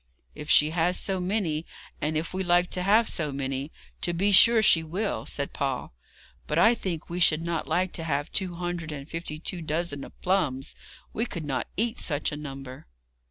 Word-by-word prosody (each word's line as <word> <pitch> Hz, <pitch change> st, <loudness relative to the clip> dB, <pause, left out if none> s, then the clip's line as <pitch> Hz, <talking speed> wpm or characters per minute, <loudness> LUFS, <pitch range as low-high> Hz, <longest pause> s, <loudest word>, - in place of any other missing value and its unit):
'If 150 Hz, +1 st, -9 dB
she 150 Hz, +1 st, +5 dB
has 175 Hz, +2 st, +1 dB
so 195 Hz, -2 st, -2 dB
many, 180 Hz, -5 st, -1 dB, 0.4 s
and 155 Hz, +1 st, 0 dB
if 165 Hz, +3 st, -3 dB
we 190 Hz, -, -1 dB
like 175 Hz, 0 st, +2 dB
to 180 Hz, -, +2 dB
have 215 Hz, +5 st, +4 dB
so 155 Hz, -3 st, -1 dB
many, 135 Hz, +1 st, -3 dB, 0.3 s
to 175 Hz, -, 0 dB
be 195 Hz, +4 st, +2 dB
sure 225 Hz, +3 st, +8 dB
she 165 Hz, -, +7 dB
will,' 185 Hz, +7 st, -3 dB
said 140 Hz, -1 st, -3 dB
Paul; 135 Hz, -, -3 dB, 0.5 s
'but 150 Hz, -, -1 dB
I 225 Hz, +7 st, +6 dB
think 180 Hz, -8 st, -4 dB
we 175 Hz, +1 st, -4 dB
should 165 Hz, -2 st, +4 dB
not 170 Hz, -1 st, -2 dB
like 185 Hz, 0 st, 0 dB
to 165 Hz, -, -4 dB
have 145 Hz, -2 st, -2 dB
two 185 Hz, -3 st, -2 dB
hundred 175 Hz, -2 st, -4 dB
and 140 Hz, -1 st, -7 dB
fifty 165 Hz, -2 st, -5 dB
two 170 Hz, +2 st, -5 dB
dozen 155 Hz, -2 st, -2 dB
of -, -, -13 dB
plums; 155 Hz, -8 st, 0 dB, 0.4 s
we 230 Hz, +3 st, -1 dB
could 170 Hz, -7 st, -6 dB
not 135 Hz, -3 st, -2 dB
eat 230 Hz, +3 st, 0 dB
such 145 Hz, -2 st, 0 dB
a -, -, -4 dB
number.' 135 Hz, -, -8 dB
165 Hz, 200 wpm, -27 LUFS, 150-185 Hz, 0.5 s, sure